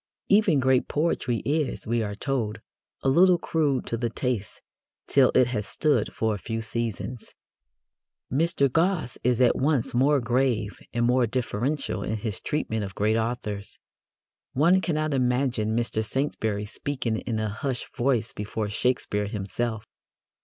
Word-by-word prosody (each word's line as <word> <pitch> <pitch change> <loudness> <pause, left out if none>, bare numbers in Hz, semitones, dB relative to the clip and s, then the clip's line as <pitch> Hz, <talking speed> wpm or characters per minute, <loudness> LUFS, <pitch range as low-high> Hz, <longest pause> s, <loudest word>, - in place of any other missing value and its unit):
Even 200 -7 +5
great 130 -1 +3
poetry 145 -6 0
is, 150 -1 -1
we 115 +1 0
are 105 -2 -3
told, 115 -3 -2 0.4
a - - +1
little 175 +6 +6
crude 150 -6 0
to 115 - -2
the 120 0 -1
taste 115 -3 -3 0.5
till 135 -3 +4
it 130 - +6
has 110 -4 -2
stood 150 -2 +1
for 110 -1 0
a 105 - -4
few 115 +4 -4
seasons. 115 +1 -4 1.0
Mr. 160 0 +2
Gosse 165 -1 0
is 125 -1 +2
at 125 - +5
once 140 -3 +1
more 140 +4 +4
grave 120 -3 0
and 120 0 +1
more 125 0 +3
deferential 130 +1 -2
in 110 +2 -2
his 105 -2 -4
treatment 110 -8 -1
of 95 -1 -6
great 105 +2 +2
authors. 110 -3 -3 0.8
One 170 +7 +4
cannot 155 -3 -1
imagine 125 -4 +1
Mr. 115 -2 0
Saintsbury 110 -4 -1
speaking 120 0 -3
in 115 -3 -3
a 110 0 -1
hushed 125 +4 -4
voice 120 -3 +1
before 105 +1 -3
Shakespeare 105 -2 0
himself. 110 +2 -3
120 Hz, 145 wpm, -26 LUFS, 110-140 Hz, 1.0 s, little